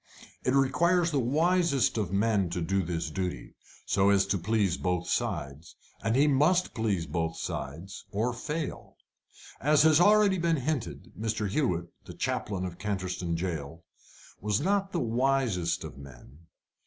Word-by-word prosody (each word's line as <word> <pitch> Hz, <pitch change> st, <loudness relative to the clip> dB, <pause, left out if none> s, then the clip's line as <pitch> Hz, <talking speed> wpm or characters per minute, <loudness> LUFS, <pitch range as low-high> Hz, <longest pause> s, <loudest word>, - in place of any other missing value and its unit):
It 130 Hz, -, +1 dB
requires 170 Hz, +6 st, +3 dB
the 145 Hz, -, +1 dB
wisest 155 Hz, +2 st, +2 dB
of 105 Hz, -6 st, -1 dB
men 100 Hz, -2 st, +1 dB
to 85 Hz, +1 st, -3 dB
do 95 Hz, +3 st, 0 dB
his 80 Hz, -2 st, -3 dB
duty, 90 Hz, +2 st, -4 dB, 0.3 s
so 100 Hz, 0 st, +3 dB
as 100 Hz, -1 st, +4 dB
to 100 Hz, 0 st, 0 dB
please 100 Hz, -1 st, +1 dB
both 90 Hz, -2 st, -1 dB
sides; 70 Hz, +4 st, -3 dB, 0.3 s
and 115 Hz, +1 st, +1 dB
he 140 Hz, +3 st, +5 dB
must 150 Hz, +6 st, +3 dB
please 105 Hz, -7 st, -1 dB
both 80 Hz, +1 st, -2 dB
sides 80 Hz, +5 st, -6 dB
or 115 Hz, +5 st, -1 dB
fail. 150 Hz, +5 st, -5 dB, 0.6 s
As 150 Hz, +2 st, +4 dB
has 160 Hz, +1 st, +5 dB
already 205 Hz, -1 st, +5 dB
been 165 Hz, -1 st, +2 dB
hinted, 140 Hz, -1 st, -3 dB
Mr. 110 Hz, 0 st, -2 dB
Hewett, 95 Hz, -, 0 dB, 0.2 s
the -, -, -10 dB
Chaplain 95 Hz, -3 st, -2 dB
of 90 Hz, -1 st, -7 dB
Canterstone 95 Hz, -4 st, -2 dB
Jail, 80 Hz, -2 st, -4 dB, 0.6 s
was 105 Hz, +1 st, 0 dB
not 195 Hz, +4 st, 0 dB
the 175 Hz, -, -1 dB
wisest 120 Hz, -, 0 dB
of -, -, -9 dB
men. 70 Hz, +3 st, -14 dB
105 Hz, 150 wpm, -28 LUFS, 90-145 Hz, 0.6 s, he